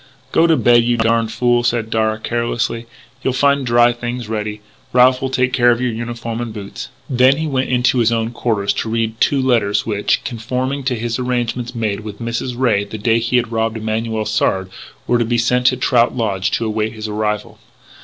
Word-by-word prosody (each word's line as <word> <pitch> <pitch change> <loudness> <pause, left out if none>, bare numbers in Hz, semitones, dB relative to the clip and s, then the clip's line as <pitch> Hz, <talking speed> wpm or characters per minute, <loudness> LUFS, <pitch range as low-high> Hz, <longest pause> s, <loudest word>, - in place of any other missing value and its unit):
"Go 165 - +4
to 165 -2 +3
bed, 120 -1 +5
you 120 0 +1
darned 115 0 +1
fool," 120 +1 +2
said 120 -2 -1
Darragh, 110 0 0
carelessly. 120 0 -2 0.3
"You'll 130 - 0
find 140 +1 +2
dry 120 0 +4
things 120 0 -5
ready. 105 -1 -4 0.3
Ralph 125 +1 +5
will 135 - -1
take 130 -1 0
care 120 -1 +4
of 120 -1 +2
your 125 -1 0
uniform 115 0 -5
and 120 -2 -4
boots." 100 -2 -8 0.2
Then 130 +1 +4
he 160 - -2
went 135 -3 -1
into 125 0 +2
his 115 -1 +3
own 115 0 -1
quarters 105 -4 -1
to 110 - -4
read 115 0 -2
two 140 - +3
letters 115 -6 +1
which, 105 -2 0
conforming 125 +4 -3
to 120 -3 -1
arrangements 125 -1 -2
made 110 -3 -1
with 105 -1 -8
Mrs. 120 +2 -4
Ray 115 -6 +2
the 100 +2 -7
day 115 +2 +2
he 115 +2 +1
had 120 -1 -1
robbed 115 0 -1
Emanuel 110 0 -2
Sard, 95 -3 0 0.3
were 120 - +2
to - - +2
be 120 +1 0
sent 125 +1 +2
to 130 - +3
Trout 125 -1 +2
Lodge 95 -5 0
to 115 - -1
await 110 0 -1
his 110 -1 -6
arrival. 105 0 -3
115 Hz, 200 wpm, -18 LUFS, 110-125 Hz, 0.3 s, bed